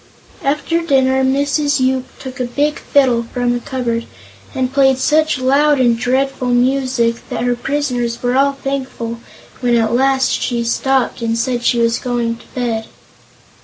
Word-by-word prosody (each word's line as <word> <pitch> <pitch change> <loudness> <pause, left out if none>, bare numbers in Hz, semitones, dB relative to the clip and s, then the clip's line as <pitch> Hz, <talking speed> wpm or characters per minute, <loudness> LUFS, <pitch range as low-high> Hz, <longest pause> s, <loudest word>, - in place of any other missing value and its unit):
After 300 +4 0
dinner 265 -4 +2
Mrs. 285 +2 +1
Yoop 260 0 0
took 260 -1 -9
a 250 - 0
big 290 +5 -1
fiddle 255 -4 +2
from 245 -1 -1
a - - +2
big - - -20
cupboard 240 -4 -2 0.5
and 260 0 -1
played 270 -1 +4
such 310 +2 +2
loud 280 +3 +3
and 240 -2 +3
dreadful 260 +2 -1
music 250 -1 +1
that - - -3
her 245 0 +1
prisoners 245 -3 -2
were 245 +1 +1
all 280 +1 +3
thankful 265 -4 -4 0.4
when 245 -1 +1
at 225 -1 +1
last 265 +1 +2
she 240 -2 -1
stopped 260 +2 0
and 230 0 -1
said 240 0 -1
she 245 - +2
was 230 0 +1
going 235 -2 -2
to - - -18
bed. 230 -3 -2
255 Hz, 165 wpm, -17 LUFS, 240-275 Hz, 0.5 s, played